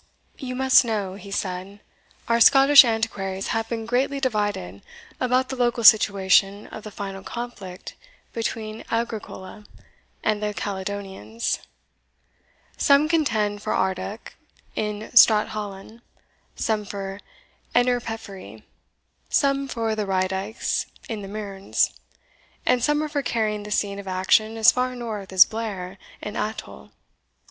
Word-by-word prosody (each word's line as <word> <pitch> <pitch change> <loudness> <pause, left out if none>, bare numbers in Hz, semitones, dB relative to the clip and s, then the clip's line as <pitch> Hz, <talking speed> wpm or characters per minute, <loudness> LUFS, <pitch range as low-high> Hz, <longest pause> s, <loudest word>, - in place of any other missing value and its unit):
"You 255 -2 -5
must 265 0 +5
know," 210 -5 -2
he 200 +1 -11
said, 195 0 -4 0.5
"our 235 0 +2
Scottish 275 +3 +9
antiquaries 215 -5 -2
have 225 0 -1
been 225 -1 -3
greatly 260 +4 0
divided 205 - -2 0.4
about 255 +1 +1
the 265 - -3
local 240 -2 0
situation 200 -1 +5
of 220 - -9
the 215 - -7
final 195 -2 -6
conflict 205 -5 -7 0.4
between 225 -1 -4
Agricola 220 -3 -4 0.6
and 215 -1 0
the 210 -1 -2
Caledonians; 200 +3 -4 1.2
some 285 +2 +4
contend 215 -11 0
for 215 - -2
Ardoch 190 +3 -2 0.4
in 210 0 -4
Strathallan, 215 -1 +3 0.5
some 215 -2 -1
for 195 -1 -6 0.6
Innerpeffry, 225 - -2 0.7
some 275 0 +1
for 225 -3 -2
the 210 -2 -2
Raedykes 190 +3 -1 0.2
in 220 -3 -4
the 195 - -7
Mearns, 200 -1 -1 0.7
and 245 -2 +2
some 295 +2 +2
are - - -2
for 290 -1 -2
carrying 215 -4 -1
the 210 - -8
scene 200 -1 -1
of 200 - -9
action 190 +4 +2
as 220 - +7
far 255 0 -1
north 220 -5 -6
as 190 0 +8
Blair 195 -4 -5 0.2
in 210 - -5
Athole. 70 - -5
215 Hz, 125 wpm, -24 LUFS, 195-235 Hz, 1.2 s, Scottish